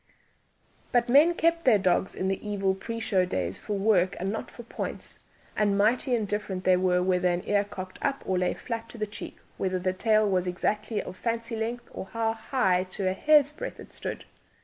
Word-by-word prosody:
But 240 0 +2
men 305 +7 +6
kept 335 +1 +2
their 240 -5 +6
dogs 185 -1 +1
in 185 - -2
the 190 0 -2
evil 200 -2 0
pre 230 +4 -5
show 195 -4 +2
days 95 - -2
for 205 - -3
work 195 -3 +3
and 190 +2 -1
not 220 - -4
for 240 - -11
points, 235 - -5 0.4
and 205 -2 +2
mighty 245 +5 +3
indifferent 205 -4 -2
were 185 - +5
they 180 - +5 0.2
whether 180 0 +2
an 175 0 0
ear 205 0 +3
cocked 185 -2 -8
up 275 -1 -1
or 185 -1 +1
lay 180 - 0
flat 230 -1 -5
to - - -8
the 215 - -1
cheek, 205 - -8 0.2
whether 185 -1 0
the 185 0 -1
tail 215 +2 +3
was 185 -2 +1
exactly 210 +4 -1
of 185 - -8
fancy 230 +2 -2
length, 235 +2 -3
or - - -6
how 225 +1 -1
high 220 -5 +1
to 190 +1 -3
a 185 - +2
hair's 295 +5 +4
breadth - - -6
it - - -12
stood. - - -5
205 Hz, 205 wpm, -27 LUFS, 185-230 Hz, 0.4 s, men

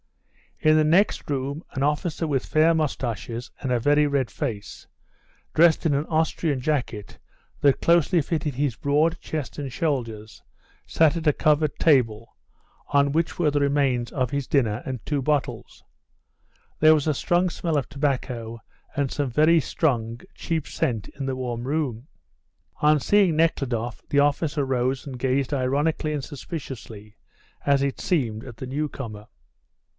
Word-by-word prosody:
In 155 0 +5
the 155 - +4
next 175 +7 +2
room 140 +3 -2
an 135 - -3
officer 150 +3 0
with 135 -4 -1
fair 160 +2 +3
moustaches 125 -6 -3
and 130 - -2
a 125 - +2
very 145 +4 +3
red 140 -4 0
face, 110 -9 -5 0.7
dressed 165 0 +4
in 155 - +3
an 140 +2 0
Austrian 160 -2 0
jacket 125 -7 -3 0.4
that 140 -2 +3
closely 170 +1 +4
fitted 150 -2 -2
his 140 -3 0
broad 155 +6 +1
chest 155 -4 -5
and 140 -2 -4
shoulders, 115 -8 -3 0.5
sat 160 0 +3
at 165 - -5
a 150 - +5
covered 150 -1 +2
table, 115 -7 +2 0.5
on 140 0 +3
which 165 +3 0
were 165 -4 +2
the 145 - +1
remains 140 -4 +1
of 130 -3 -1
his 140 -2 -2
dinner 120 -5 +1
and 130 -4 -5
two 145 -2 -1
bottles; 145 0 -2 1.0
there 155 0 +7
was 150 - -1
a 155 - +3
strong 175 +6 +1
smell 165 -2 -2
of 140 - -1
tobacco 125 -5 -2 0.4
and 140 -2 0
some 145 -3 -1
very 155 +7 +4
strong, 120 -6 -1
cheap 160 -3 -3
scent 110 -5 -2
in 140 -1 -6
the 135 - -1
warm 120 -2 -4
room. 135 -3 -2 0.7
On 150 0 +5
seeing 190 +2 +3
Nekhludoff 125 -8 0
the 145 - +3
officer 145 0 +1
rose 130 +1 -1
and 130 -2 -6
gazed 130 +2 0
ironically 145 +4 0
and 145 -2 -3
suspiciously, 130 - -8 0.5
as 140 -1 +3
it 140 -1 -2
seemed, 120 - -1
at 120 -3 -10
the 130 - -6
newcomer. 130 -6 -5
140 Hz, 155 wpm, -24 LUFS, 125-155 Hz, 1.0 s, there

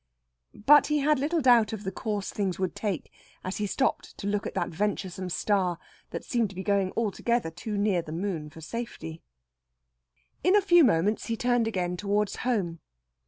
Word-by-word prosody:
But 295 +1 +7
he 300 - +1
had 295 0 +2
little 315 +4 0
doubt 235 -5 +5
of 215 -2 -5
the 190 - -3
course 205 0 -3
things 195 -4 -2
would 185 -2 -2
take 200 -7 -3 0.3
as 185 - -4
he 210 - -1
stopped 265 +7 -1
to - - -7
look 205 0 -1
at - - -7
that - - 0
venturesome 190 0 -2
star, 185 -2 +1 0.3
that - - -6
seemed 235 -4 0
to 190 - -12
be 190 - -5
going 200 -2 +1
altogether 230 -2 0
too 205 +6 -5
near 200 -3 +2
the 160 -2 -9
moon 165 -3 -3
for 160 - -13
safety. 165 -4 -6 1.2
In 370 +2 +4
a - - +7
few 350 -3 +6
moments 210 - +2
he 230 - -1
turned 245 -1 +2
again 180 -4 -2
towards 205 +1 0
home. 195 -9 -1
205 Hz, 185 wpm, -28 LUFS, 185-235 Hz, 1.2 s, But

